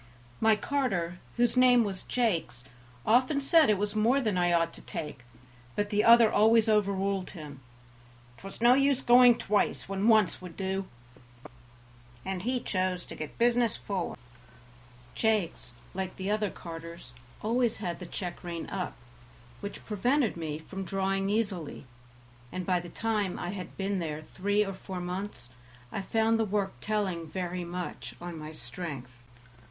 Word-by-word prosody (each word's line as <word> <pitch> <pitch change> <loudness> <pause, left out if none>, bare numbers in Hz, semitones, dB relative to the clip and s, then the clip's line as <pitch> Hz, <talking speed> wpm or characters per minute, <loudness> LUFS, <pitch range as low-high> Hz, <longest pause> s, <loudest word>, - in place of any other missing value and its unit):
My 220 -1 +5
carter, 195 -10 -1 0.2
whose 240 +1 +3
name 250 -1 +6
was 195 -3 -3
Jakes, 180 - -1 0.4
often 255 +6 +4
said 310 +1 +5
it 210 - +4
was 205 +1 -1
more 230 +6 +3
than 215 -7 0
I 175 -1 +2
ought 165 -1 +2
to - - -12
take, 150 -4 -6 0.6
but 205 +1 -1
the 210 0 +3
other 230 -1 +7
always 220 +1 +5
overruled 200 -3 +1
him. 145 -4 -9 0.8
"'Twas 195 +3 -9
no 240 +1 +7
use 275 0 +3
going 245 -1 +7
twice 205 +1 0
when 195 +2 0
once 215 -5 +4
would 180 -3 -10
do, 190 0 -2 1.4
and 190 -1 -3
he 250 +5 0
chose 185 -4 -1
to - - -9
get 155 -1 -7
business 235 -1 +3
forward." 190 -4 -3 1.0
Jakes, 210 - 0 0.2
like 190 0 -4
the 190 +2 -3
other 210 -1 +1
carters, 165 -6 -9 0.3
always 235 +1 +1
had 175 -5 -4
the 180 - -7
check 175 -1 -5
rein 170 -2 -5
up, 185 -2 -3 0.6
which 200 - -7
prevented 240 +4 +1
me 155 -3 -4
from 195 +5 -7
drawing 195 +1 0
easily, 200 -10 -2 0.7
and 185 -1 -4
by 180 -1 +2
the 175 0 -8
time 210 -4 -1
I 175 - -3
had 190 -2 -7
been 195 0 -1
there 155 -2 -4
three 205 +5 0
or 195 - -4
four 185 -1 -7
months 180 -8 -5 0.4
I - - -3
found 225 +3 +2
the - - +3
work 200 -1 -1
telling 195 -6 -1
very 180 +2 -3
much 175 +1 -6
on 175 -1 -6
my 155 0 -7
strength. 125 -3 -6
195 Hz, 155 wpm, -29 LUFS, 175-220 Hz, 1.4 s, other